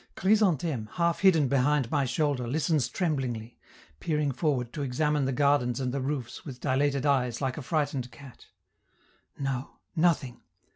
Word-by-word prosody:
Chrysantheme, 175 Hz, -, +2 dB
half 170 Hz, -1 st, +1 dB
hidden 165 Hz, -7 st, +5 dB
behind 135 Hz, -1 st, +2 dB
my 145 Hz, -3 st, +2 dB
shoulder, 135 Hz, -2 st, 0 dB
listens 150 Hz, +1 st, +1 dB
tremblingly, 130 Hz, -, -2 dB, 0.4 s
peering 150 Hz, -3 st, 0 dB
forward 130 Hz, -4 st, -1 dB
to 150 Hz, -, -4 dB
examine 145 Hz, +2 st, 0 dB
the 135 Hz, -, 0 dB
gardens 140 Hz, -2 st, +2 dB
and 125 Hz, -1 st, -2 dB
the 140 Hz, -, -1 dB
roofs 130 Hz, -3 st, -4 dB
with 130 Hz, -5 st, -8 dB
dilated 140 Hz, 0 st, +1 dB
eyes 125 Hz, -5 st, +1 dB
like 130 Hz, -2 st, -1 dB
a -, -, -5 dB
frightened 140 Hz, -3 st, -1 dB
cat. 130 Hz, +1 st, -14 dB, 0.9 s
No, 135 Hz, -1 st, -4 dB, 0.2 s
nothing! 155 Hz, -7 st, +1 dB
140 Hz, 145 wpm, -28 LUFS, 125-150 Hz, 0.9 s, hidden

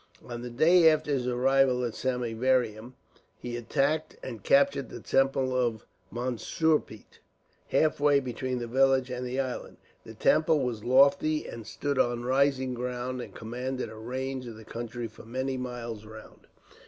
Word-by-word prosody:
On 120 Hz, -1 st, -6 dB
the 125 Hz, -, -6 dB
day 160 Hz, +7 st, +6 dB
after 155 Hz, -1 st, 0 dB
his 130 Hz, -3 st, 0 dB
arrival 130 Hz, 0 st, +3 dB
at 115 Hz, -, -3 dB
Samieaveram, 125 Hz, -2 st, 0 dB, 0.4 s
he 120 Hz, -1 st, -6 dB
attacked 145 Hz, +6 st, -1 dB
and 115 Hz, -5 st, -6 dB
captured 140 Hz, +2 st, +3 dB
the -, -, -8 dB
temple 135 Hz, -1 st, +1 dB
of 120 Hz, -4 st, 0 dB, 0.3 s
Mansurpet, 125 Hz, +1 st, -1 dB, 0.5 s
halfway 145 Hz, -2 st, +3 dB
between 130 Hz, 0 st, -3 dB
the 120 Hz, -, -3 dB
village 130 Hz, +1 st, +2 dB
and 125 Hz, 0 st, -4 dB
the 125 Hz, +1 st, -3 dB
island. 130 Hz, -2 st, -4 dB, 0.3 s
The -, -, -11 dB
temple 155 Hz, -1 st, +3 dB
was 115 Hz, -4 st, -3 dB
lofty, 140 Hz, +4 st, +4 dB
and 115 Hz, -2 st, -8 dB
stood 140 Hz, +2 st, -2 dB
on 120 Hz, 0 st, +1 dB
rising 130 Hz, 0 st, +2 dB
ground, 125 Hz, +1 st, -4 dB
and -, -, -10 dB
commanded 125 Hz, +3 st, -4 dB
a -, -, -10 dB
range 130 Hz, +3 st, -4 dB
of 115 Hz, -, -8 dB
the 110 Hz, -, -13 dB
country 120 Hz, +1 st, -5 dB
for -, -, -14 dB
many 130 Hz, +4 st, -3 dB
miles 120 Hz, -4 st, -5 dB
round. 110 Hz, 0 st, -13 dB
125 Hz, 155 wpm, -28 LUFS, 120-135 Hz, 0.5 s, day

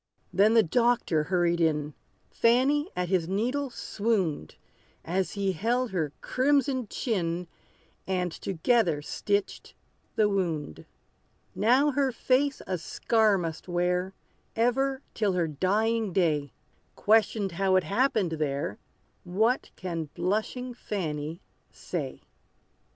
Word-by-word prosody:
Then 205 Hz, +5 st, +4 dB
the 225 Hz, -, +7 dB
doctor 225 Hz, -5 st, +2 dB
hurried 175 Hz, -1 st, +1 dB
in: 150 Hz, -2 st, +1 dB, 0.4 s
Fanny 270 Hz, +7 st, +3 dB
at 180 Hz, -1 st, -2 dB
his 180 Hz, -4 st, +1 dB
needle 250 Hz, +8 st, -1 dB
swooned, 200 Hz, -, -2 dB, 0.5 s
As 185 Hz, +3 st, -1 dB
he 200 Hz, -1 st, 0 dB
held 235 Hz, +7 st, 0 dB
her 160 Hz, -6 st, -1 dB
crimson 265 Hz, -2 st, +1 dB
chin, 180 Hz, -7 st, -2 dB, 0.6 s
And 180 Hz, -2 st, 0 dB
together 175 Hz, -3 st, +1 dB
stitched 205 Hz, +5 st, -2 dB, 0.4 s
the 215 Hz, -, +4 dB
wound. 170 Hz, -, -2 dB, 0.7 s
Now 255 Hz, +7 st, +3 dB
her 275 Hz, -1 st, +1 dB
face 265 Hz, +3 st, +1 dB
a 185 Hz, -2 st, -2 dB
scar 215 Hz, +4 st, +2 dB
must 165 Hz, -2 st, -5 dB
wear, 180 Hz, +1 st, 0 dB, 0.4 s
Ever 265 Hz, +4 st, +1 dB
till 210 Hz, -4 st, +1 dB
her 175 Hz, -2 st, +1 dB
dying 210 Hz, +6 st, 0 dB
day! 150 Hz, -7 st, +1 dB, 0.4 s
Questioned 215 Hz, -2 st, +2 dB
how 190 Hz, +2 st, +1 dB
it 185 Hz, -, +4 dB
happened 220 Hz, -4 st, +1 dB
there, 140 Hz, -8 st, -2 dB, 0.4 s
What 220 Hz, +8 st, +1 dB
can 170 Hz, -3 st, -4 dB
blushing 220 Hz, +6 st, -2 dB
Fanny 165 Hz, -7 st, -4 dB, 0.3 s
say? -, -, -5 dB
195 Hz, 110 wpm, -28 LUFS, 170-235 Hz, 0.7 s, the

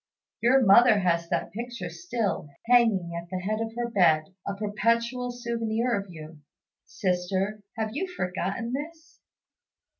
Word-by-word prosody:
Your 255 Hz, +2 st, +4 dB
mother 220 Hz, +3 st, +7 dB
has 170 Hz, -3 st, +1 dB
that -, -, -1 dB
picture 235 Hz, -5 st, -6 dB
still, 175 Hz, 0 st, -3 dB, 0.2 s
hanging 225 Hz, -8 st, +4 dB
at 170 Hz, 0 st, -6 dB
the 185 Hz, -, -3 dB
head 215 Hz, +3 st, -1 dB
of 225 Hz, 0 st, -3 dB
her 240 Hz, 0 st, -1 dB
bed, 175 Hz, -6 st, +3 dB
a 200 Hz, -, -2 dB
perpetual 230 Hz, +4 st, 0 dB
souvenir 235 Hz, -1 st, -1 dB
of 200 Hz, -3 st, -2 dB
you. 155 Hz, -2 st, -10 dB, 0.5 s
Sister, 190 Hz, +2 st, -1 dB, 0.2 s
have 220 Hz, -1 st, -2 dB
you 370 Hz, +8 st, -2 dB
forgotten 200 Hz, -, -3 dB
this? 315 Hz, +3 st, -7 dB
215 Hz, 140 wpm, -27 LUFS, 185-240 Hz, 0.5 s, mother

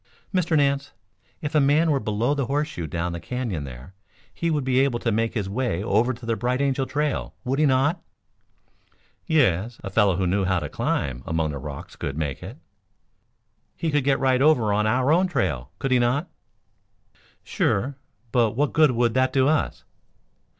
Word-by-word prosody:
"Mr. 175 Hz, -3 st, +2 dB
Nance, 140 Hz, 0 st, +1 dB, 0.5 s
if 150 Hz, -, -3 dB
a 155 Hz, -, +4 dB
man 150 Hz, +4 st, +3 dB
were 140 Hz, -, +2 dB
below 115 Hz, +4 st, 0 dB
the 140 Hz, -4 st, -1 dB
horseshoe 145 Hz, -, -2 dB
down 85 Hz, +3 st, -2 dB
the 85 Hz, -, -5 dB
Canyon 115 Hz, -, -4 dB
there, 65 Hz, +6 st, -10 dB, 0.4 s
he 170 Hz, -, -2 dB
would 150 Hz, -3 st, 0 dB
be 130 Hz, 0 st, +2 dB
able 135 Hz, -3 st, +2 dB
to 120 Hz, 0 st, -1 dB
make 115 Hz, +3 st, 0 dB
his 105 Hz, -4 st, -1 dB
way 100 Hz, -3 st, -1 dB
over 115 Hz, +3 st, +2 dB
to 120 Hz, -1 st, -8 dB
the 115 Hz, 0 st, 0 dB
Bright 125 Hz, +4 st, -1 dB
Angel 135 Hz, -1 st, 0 dB
Trail, 150 Hz, 0 st, -2 dB
would 135 Hz, +2 st, -1 dB
he 155 Hz, -, +4 dB
not?" 140 Hz, +6 st, +2 dB, 1.3 s
"Yes. 120 Hz, -, +2 dB
A 100 Hz, -, -5 dB
fellow 100 Hz, -2 st, +3 dB
who 95 Hz, +1 st, 0 dB
knew 95 Hz, +3 st, +1 dB
how 95 Hz, 0 st, +1 dB
to 75 Hz, -4 st, -3 dB
climb 65 Hz, -2 st, -2 dB
among 80 Hz, -1 st, 0 dB
the 70 Hz, -, -5 dB
rocks 70 Hz, +1 st, -8 dB
could 70 Hz, -, -5 dB
make 75 Hz, -4 st, -3 dB
it." -, -, -8 dB, 1.2 s
"He 165 Hz, -, -1 dB
could 145 Hz, -2 st, +1 dB
get 135 Hz, 0 st, +2 dB
right 130 Hz, -1 st, +2 dB
over 125 Hz, -8 st, +4 dB
on 105 Hz, +1 st, +1 dB
our 130 Hz, +5 st, +2 dB
own 180 Hz, +4 st, +4 dB
trail, 70 Hz, -, -1 dB
could 135 Hz, -2 st, -3 dB
he 125 Hz, -, +4 dB
not?" 125 Hz, +8 st, +1 dB, 1.2 s
"Sure! 130 Hz, +8 st, 0 dB, 0.4 s
But 115 Hz, -3 st, +2 dB
what 145 Hz, +3 st, 0 dB
good 155 Hz, -2 st, +5 dB
would 120 Hz, -2 st, +1 dB
that 130 Hz, 0 st, +2 dB
do 135 Hz, -1 st, +3 dB
us?" 155 Hz, 0 st, 0 dB
125 Hz, 185 wpm, -24 LUFS, 100-140 Hz, 1.3 s, good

